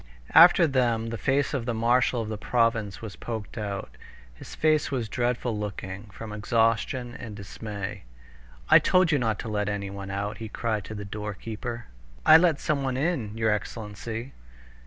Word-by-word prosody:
After 170 Hz, +1 st, +8 dB
them 120 Hz, -5 st, +1 dB
the 115 Hz, -, -4 dB
face 135 Hz, +1 st, +1 dB
of 130 Hz, -5 st, -2 dB
the 120 Hz, -, 0 dB
marshal 120 Hz, +1 st, +2 dB
of -, -, -6 dB
the 110 Hz, -, -3 dB
province 115 Hz, -4 st, 0 dB
was 105 Hz, -6 st, -6 dB
poked 110 Hz, +2 st, -6 dB
out. 100 Hz, -3 st, -4 dB, 0.4 s
His -, -, -11 dB
face 155 Hz, -1 st, +2 dB
was 125 Hz, -5 st, -2 dB
dreadful 120 Hz, 0 st, -1 dB
looking 100 Hz, -1 st, -5 dB
from 105 Hz, +2 st, -9 dB
exhaustion 115 Hz, +3 st, 0 dB
and 110 Hz, -3 st, -8 dB
dismay. 100 Hz, -, -6 dB, 0.6 s
"I -, -, +8 dB
told 185 Hz, -2 st, +3 dB
you 150 Hz, -, +3 dB
not 110 Hz, -3 st, 0 dB
to -, -, -7 dB
let 105 Hz, -1 st, -1 dB
anyone 100 Hz, -1 st, -4 dB
out!" 100 Hz, +2 st, -3 dB
he 110 Hz, -1 st, -6 dB
cried 110 Hz, -3 st, -2 dB
to 110 Hz, -, -7 dB
the 105 Hz, -1 st, -6 dB
doorkeeper. 110 Hz, +3 st, -5 dB, 0.4 s
"I 155 Hz, -, +10 dB
let 165 Hz, -3 st, +3 dB
someone 135 Hz, -4 st, -1 dB
in, 130 Hz, -9 st, -1 dB
your 110 Hz, -1 st, +2 dB
excellency!" 110 Hz, +4 st, -4 dB
115 Hz, 165 wpm, -27 LUFS, 105-125 Hz, 0.6 s, I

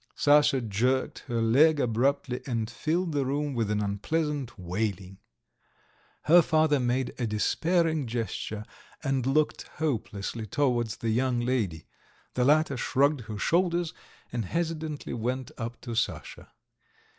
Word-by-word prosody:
Sasha 145 Hz, -2 st, +4 dB
jerked 120 Hz, +5 st, 0 dB
her 115 Hz, -3 st, 0 dB
leg 145 Hz, +7 st, +5 dB
abruptly 125 Hz, +1 st, 0 dB
and 115 Hz, -4 st, -1 dB
filled 165 Hz, +8 st, -1 dB
the 145 Hz, -2 st, +1 dB
room 145 Hz, +2 st, -1 dB
with 115 Hz, -4 st, -1 dB
an 105 Hz, 0 st, 0 dB
unpleasant 140 Hz, +6 st, -2 dB
wailing. 95 Hz, 0 st, -3 dB, 1.0 s
Her 175 Hz, +3 st, +7 dB
father 155 Hz, -3 st, +3 dB
made 125 Hz, +1 st, 0 dB
a 120 Hz, -, 0 dB
despairing 160 Hz, -, +1 dB
gesture, 110 Hz, -2 st, -4 dB, 0.4 s
and 135 Hz, -3 st, 0 dB
looked 150 Hz, +3 st, +1 dB
hopelessly 115 Hz, -7 st, -3 dB
towards 120 Hz, -3 st, 0 dB
the 115 Hz, -3 st, -2 dB
young 125 Hz, +1 st, +1 dB
lady. 110 Hz, -11 st, -1 dB, 0.5 s
The 125 Hz, -, +1 dB
latter 150 Hz, -1 st, +3 dB
shrugged 140 Hz, +3 st, +2 dB
her 105 Hz, -, -5 dB
shoulders, 170 Hz, -, +1 dB, 0.4 s
and 115 Hz, -3 st, -2 dB
hesitatingly 160 Hz, -, -3 dB
went 125 Hz, +3 st, -3 dB
up 115 Hz, +1 st, -5 dB
to 120 Hz, -, -6 dB
Sasha. 115 Hz, -, -3 dB
130 Hz, 130 wpm, -28 LUFS, 115-150 Hz, 1.0 s, Her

